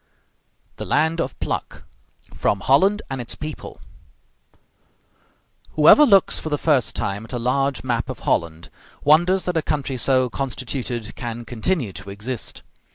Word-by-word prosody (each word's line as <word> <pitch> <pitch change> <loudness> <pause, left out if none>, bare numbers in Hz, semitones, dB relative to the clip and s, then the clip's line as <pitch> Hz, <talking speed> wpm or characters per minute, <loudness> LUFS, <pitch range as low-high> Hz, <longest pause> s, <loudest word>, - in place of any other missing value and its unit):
THE - - -5
LAND 160 +3 +1
OF - - -5
PLUCK - - -4 0.5
From 100 - 0
'Holland 195 +10 +3
and 135 -1 -3
Its 120 - -4
People' 155 0 -7 1.9
Whoever 160 - +7
looks 195 -4 +4
for 155 - -5
the 145 - 0
first 145 -6 +1
time 100 +2 -2
at 110 - -11
a - - -1
large 135 +3 0
map 120 -2 -1
of - - -6
Holland 85 0 -1 0.3
wonders 175 +6 +4
that 180 -2 -1
a - - +2
country 140 -3 -2
so 130 +1 +2
constituted 125 -3 -4
can 120 -1 -6
continue 120 - -1
to 100 +1 -8
exist. 105 +5 -5
135 Hz, 145 wpm, -22 LUFS, 120-155 Hz, 1.9 s, Whoever